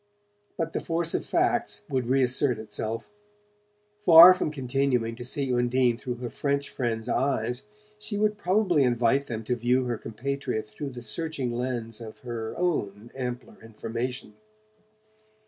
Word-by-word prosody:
But 165 -2 -2
the - - -2
force 165 0 -1
of - - -2
facts - - +1
would 130 -3 -1
reassert 130 0 +2
itself. 110 - -4 0.9
Far 170 0 +11
from 180 - -2
continuing 130 -4 0
to 120 - -8
see 130 +1 -1
Undine 120 0 +2
through 125 +1 -5
her 120 0 -5
French 140 0 -1
friends' 115 -3 -2
eyes 125 - -1 0.3
she 210 -1 -4
would 210 0 +2
probably 185 -4 +2
invite 125 +2 +2
them 115 -2 -4
to 125 +3 -1
view 125 +2 +1
her 120 -3 -2
compatriot 125 -1 -3
through 105 +7 -7
the 125 -2 -9
searching 135 +1 -3
lens 120 -2 -3
of 110 -1 -10
her 115 -3 -5
own 115 - -2
ampler 125 -2 -5
information. 115 +3 -5
125 Hz, 145 wpm, -27 LUFS, 115-140 Hz, 0.9 s, Far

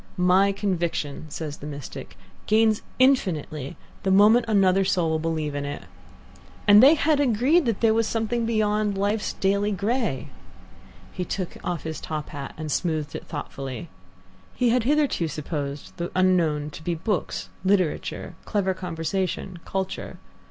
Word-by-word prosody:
"My 185 +2 +4
conviction," 170 -6 -2
says 150 0 -5
the 145 - -8
mystic, 145 -2 -8 0.3
"gains 220 0 +3 0.2
infinitely 165 - +1 0.2
the 195 - -1
moment 210 +5 +6
another 195 -3 +4
soul 180 -4 +1
will 160 - +1
believe 155 -2 -2
in 145 0 -3
it," 145 0 -5 0.8
and 205 +1 +9
they 280 +5 +8
had 310 -1 +2
agreed 270 +5 +3
that 225 -4 -1
there 225 -1 +5
was 225 0 +2
something 230 +1 -1
beyond 210 -2 +1
life's 205 +2 0
daily 200 +2 +1
grey. 210 - -1 0.8
He 180 - -3
took 180 0 -4
off 175 -3 -3
his 160 -1 -5
top 155 -2 -4
hat 140 -2 -7
and 155 -1 -4
smoothed 155 -3 -1
it - - -7
thoughtfully. 135 -1 -6 0.7
He 250 -2 +2
had 240 -1 +2
hitherto 285 - +2
supposed 145 -2 -5
the 175 0 -3
unknown 165 -5 +2
to 160 - -10
be 170 +1 -1
books, 185 +4 -2
literature, 190 -4 0
clever 195 -3 0
conversation, 180 +1 -3
culture. 190 -1 -4
185 Hz, 145 wpm, -25 LUFS, 160-215 Hz, 0.8 s, and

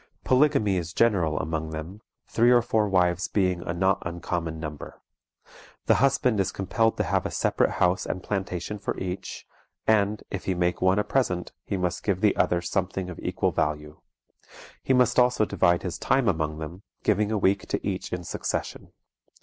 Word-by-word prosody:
Polygamy 130 -7 +3
is 85 -1 -4
general 90 -10 +2
among 80 0 -2
them, 80 +7 -7 0.3
three 120 +1 +3
or 120 -1 +5
four 110 -2 +1
wives 90 -1 +2
being 90 -3 0
a 85 - -4
not 95 +3 +1
uncommon 85 -1 -3
number. 75 -2 -7 0.9
The - - +5
husband 130 -5 +2
is 95 - +1
compelled 115 +4 0
to - - +1
have - - 0
a - - -3
separate - - +1
house 90 +3 +1
and 95 - -4
plantation 95 0 -3
for 100 - -3
each, 95 0 -5 0.4
and, 105 -1 +2
if 100 - -5
he 95 - 0
make 90 0 0
one 95 +1 +3
a 105 - +2
present, 90 -10 -1 0.2
he 100 - -1
must 90 -1 -2
give 100 -3 0
the 105 -2 +3
others 85 0 +1
something 95 -1 -2
of 90 - -9
equal - - 0
value. 75 0 -2 0.8
He 130 - +1
must 125 -1 +3
also 125 -3 +3
divide 85 -4 +2
his 90 -1 -4
time 135 -3 +2
among 80 -4 0
them, 80 +4 -7 0.2
giving 105 0 +2
a 110 - +1
week 100 0 +1
to - - -2
each 95 -2 -3
in 90 -1 -3
succession. - - -4
95 Hz, 180 wpm, -26 LUFS, 85-105 Hz, 0.9 s, or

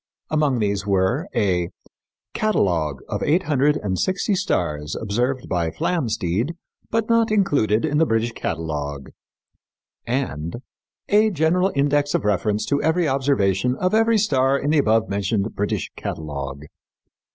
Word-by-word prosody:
Among 150 -4 +2
these 100 -2 -1
were 100 - +1
a 90 -4 +1 0.6
Catalogue 85 - 0
of - - -3
Eight 170 +5 +2
Hundred 150 0 +2
and 95 -3 -2
Sixty 190 +3 0
Stars 80 - -1
Observed 125 +5 -1
by 85 -3 0
Flamsteed 115 - -1 0.3
but 225 0 0
not 230 -1 +3
Included 145 - +2
in 150 -1 +1
the 160 - +3
British 115 +1 +1
Catalogue 75 -7 -4 1.0
and 85 - -2 0.5
A 215 +2 +4
General 180 +2 +2
Index 145 +1 +2
of - - -1
Reference 105 +1 +1
to 140 0 0
Every 160 +2 +2
Observation 125 -5 +1
of 185 +7 -1
Every 225 +1 +4
Star 135 -9 +2
in 145 +2 -1
the 155 - +4
Above 110 -3 +2
mentioned 100 +2 -1
British 105 0 -2
Catalogue. 70 -2 -5
125 Hz, 135 wpm, -22 LUFS, 95-155 Hz, 1.0 s, A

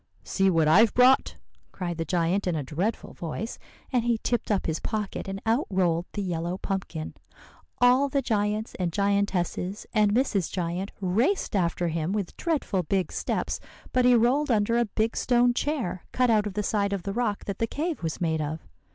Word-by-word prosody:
"'See 195 -1 +2
what 165 -4 +3
I've 205 +8 +5
brought,' 255 +2 +5 0.4
cried 175 -3 -4
the 165 - -1
giant 180 +4 0
in 175 - +1
a 150 - -2
dreadful 175 - -3
voice; 175 +7 -5 0.3
and 245 -2 +2
he 235 -1 +2
tipped 240 -2 -1
up 205 -3 +1
his 160 -1 -1
pocket, 210 -3 -3
and 195 0 -4
out 230 +6 +1
rolled 175 -3 +1
the 205 - -2
yellow 175 0 -2
pumpkin. 190 -5 -4 0.7
All 255 +3 +5
the 275 0 0
giants 210 -1 -1
and 175 -2 0
giantesses 200 -1 0
and 210 -2 +4
Mrs. 210 - +1
Giant 180 +2 -3
raced 225 - +1
after 175 -2 +1
him 165 +3 -1
with 205 -4 -3
dreadful 295 - -1
big 185 +2 -1
steps; - - -2 0.3
but 255 - +3
he 250 0 +6
rolled 255 +6 +3
under 230 +1 +2
a 240 - +3
big 220 +1 -1
stone 245 -1 +3
chair, 250 - -2
cut 250 -2 +2
out 210 -1 +3
of 195 - -7
the 210 - 0
side 200 -1 0
of 195 -3 -3
the 200 - -3
rock 220 -3 -1
that 200 -1 -4
the 230 - +1
cave 315 +6 -3
was 160 -2 -3
made 160 -2 0
of. 150 - -5
200 Hz, 190 wpm, -26 LUFS, 175-235 Hz, 0.7 s, he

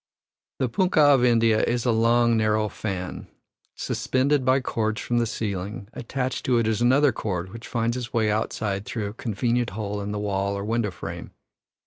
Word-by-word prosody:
The 130 - 0
punkah 155 - +4
of 130 -3 +3
India 115 -2 +4
is 120 0 0
a 120 - +3
long, 115 +1 +3
narrow 110 -1 +1
fan, 95 -4 -5 0.5
suspended 135 +2 0
by 130 +1 +3
cords 110 -3 -2
from 120 0 0
the 115 - +1
ceiling; 100 -1 -4
attached 130 +1 -3
to 125 -2 +3
it 115 - +2
is 110 0 0
another 135 +4 +4
cord 95 -4 -4
which 115 +1 -9
finds 115 0 -1
its 125 0 -5
way 110 -3 +1
outside 105 -2 -2
through 110 -4 -3
a 100 - -5
convenient 120 +2 -1
hole 105 -1 -3
in 100 +1 -4
the 105 - -3
wall 100 -1 -1
or 100 - -4
window 115 -1 0
frame. 90 - -8
115 Hz, 180 wpm, -25 LUFS, 105-120 Hz, 0.5 s, punkah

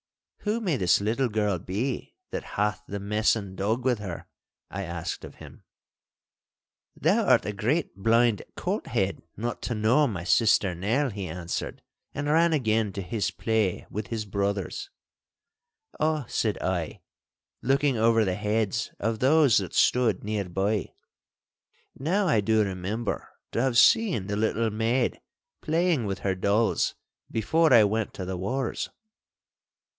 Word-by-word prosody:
'Who 215 +2 -1
may 180 - 0
this 90 -5 +3
little 115 +5 0
girl 105 -4 0
be 115 - -3 0.2
that - - -3
hath 105 +1 0
the 100 - -4
messan 105 -1 0
dog 110 +6 -1
with 125 -4 +2
her?' 95 -5 -6 0.4
I 100 - -4
asked 85 -2 -5
of - - -10
him. - - -13 1.3
'Thou - - +2
art - - +4
a 105 - -2
great 120 - -1
blind 115 +1 +3
colt - - -3
head - - -1 0.2
not 120 +3 -3
to 120 - -2
know 115 +8 +3
my 95 -7 -4
sister 100 -1 +3
Nell!' 115 - 0
he 100 -2 -5
answered, 85 +1 -5 0.3
and 145 - -2
ran 165 +2 +4
again 110 -7 +1
to 100 - -4
his 100 0 -1
play 100 +1 -1
with 105 +1 -4
his 110 -2 -3
brothers. 100 - -2 1.1
'Ah,' 155 -2 +1
said 110 -3 0
I, 90 -3 -2 0.6
looking 135 +1 +2
over 115 0 +3
the 95 - 0
heads 105 +3 -1
of 115 +1 -1
those 140 -2 +5
that 95 -4 -2
stood 120 -6 +3
near 105 -3 -2
by, 100 +3 -1 1.1
'now 185 +8 +1
I 130 -10 +3
do 110 +1 +3
remember 100 +4 -3 0.2
to 115 - 0
have 130 -2 +1
seen 180 - +5
the 100 +1 -2
little 110 +1 0
maid 115 +3 0 0.4
playing 165 -5 +1
with 95 - -3
her 95 - 0
dolls 100 +4 +1 0.3
before 160 +8 +2
I 115 -4 +8
went 105 +1 -1
to 95 - -5
the 95 0 -4
wars! 125 +8 -2
110 Hz, 150 wpm, -27 LUFS, 100-125 Hz, 1.3 s, I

